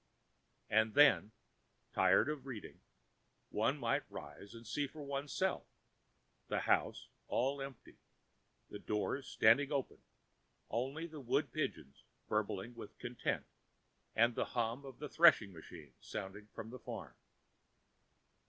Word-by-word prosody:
And 110 +1 +3
then, 145 -7 +6 0.6
tired - - +5
of 150 -3 -4
reading, 120 -6 -7 0.7
one - - +1
might - - +1
rise 100 +9 -9
and 115 0 -11
see 140 +6 -1
for 150 +2 -9
oneself, 140 +7 -1 0.8
the - - 0
house - - +1 0.2
all 135 +3 0
empty, 135 -3 -9 0.7
the - - -6
doors 120 +6 -2
standing 135 +6 +5
open, 140 -3 -2 0.7
only 135 +8 -1
the 155 -3 -8
wood 125 - +1
pigeons 70 +1 -3 0.3
bubbling 105 +1 -1
with 115 -3 -10
content 120 0 -2 0.7
and 115 +2 +5
the - - 0
hum 120 +4 0
of 135 -3 -9
the 150 - -5
threshing 140 - +6
machine 80 -4 -11
sounding 100 +2 -6
from 110 +1 -8
[Pg 130 - -8
4]the - - -31
farm. - - -6
120 Hz, 125 wpm, -36 LUFS, 105-140 Hz, 0.8 s, then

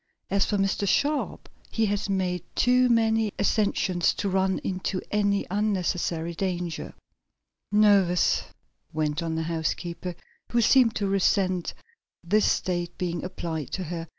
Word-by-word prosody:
As 200 0 +3
for 205 - 0
Mr. 195 +1 0
Sharp 290 +8 0 0.2
he 225 - +1
has 205 0 -1
made 185 -2 0
too 250 0 +4
many 225 -2 +2
ascensions 200 -4 +1
to 200 - -2
run 190 0 +1
into 185 0 -2
any 200 -1 +1
unnecessary 180 -5 -1
danger." 175 -2 -3 0.8
"Nervous!" 200 -4 +4 0.5
went 155 0 -1
on 165 -1 -2
the 160 - -1
housekeeper, 170 +2 -3 0.4
who 240 - +2
seemed 235 0 +4
to 205 - -1
resent 190 -2 +1 0.5
this 205 +5 +3
state 175 -1 -2
being 175 -2 -3
applied 165 -5 -4
to 185 - -2
her. 165 0 -5
190 Hz, 130 wpm, -26 LUFS, 175-205 Hz, 0.8 s, too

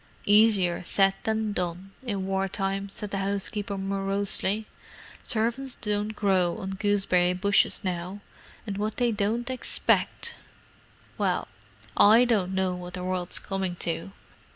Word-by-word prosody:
"Easier 205 -5 +4
said 195 +2 +3
than 220 -1 0
done, 180 +1 -3
in 200 -7 -3
war 195 0 0
time," 195 0 -2
said 205 +1 -4
the 195 - -1
housekeeper 200 +1 -2
morosely. 195 +2 0 0.6
"Servants 240 +3 -1
don't 210 0 -2
grow 190 -4 +2
on 190 - -5
gooseberry 195 -3 +2
bushes 200 +2 +2
now, 180 +1 -3 0.5
and 200 -2 -4
what 215 +1 -2
they 245 -1 +2
don't 225 +4 -1
expect——! 470 - 0 0.9
Well, - - 0 0.5
I 225 +4 +7
don't 195 -6 +1
know 190 -1 +1
what 180 0 -6
the 180 - -5
world's 185 -1 -1
coming 190 -2 -3
to." 170 +2 -3
195 Hz, 130 wpm, -27 LUFS, 190-210 Hz, 0.9 s, I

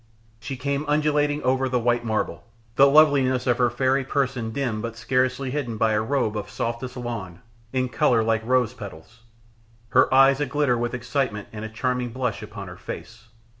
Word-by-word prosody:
She 120 +5 -6
came 140 +2 -1
undulating 150 0 +1
over 130 +1 +1
the 125 - +1
white 120 0 +1
marble, 110 -2 -2 0.3
the 140 - +7
loveliness 140 -4 +4
of 125 -2 +1
her 125 -1 +4
fairy 130 +3 +1
person 130 -3 -1
dimmed 110 -3 -2
but 115 0 -5
scarcely 130 +2 0
hidden 125 -6 -3
by 110 0 +2
a 105 - +2
robe 115 -2 0
of 105 -1 -4
softest 115 +4 -4
lawn 115 -8 -5 0.3
in 130 -1 0
colour 125 -4 +2
like 110 0 +1
rose 125 -1 +1
petals, 100 -2 -11 0.7
her 130 - +4
eyes 135 +1 +6
aglitter 145 -2 +1
with 120 +1 -2
excitement 120 -3 -2
and 105 0 -6
a 110 - -5
charming 125 +2 -2
blush 125 -2 -3
upon - - -8
her - - -10
face. 115 0 -9
125 Hz, 175 wpm, -24 LUFS, 115-135 Hz, 0.7 s, the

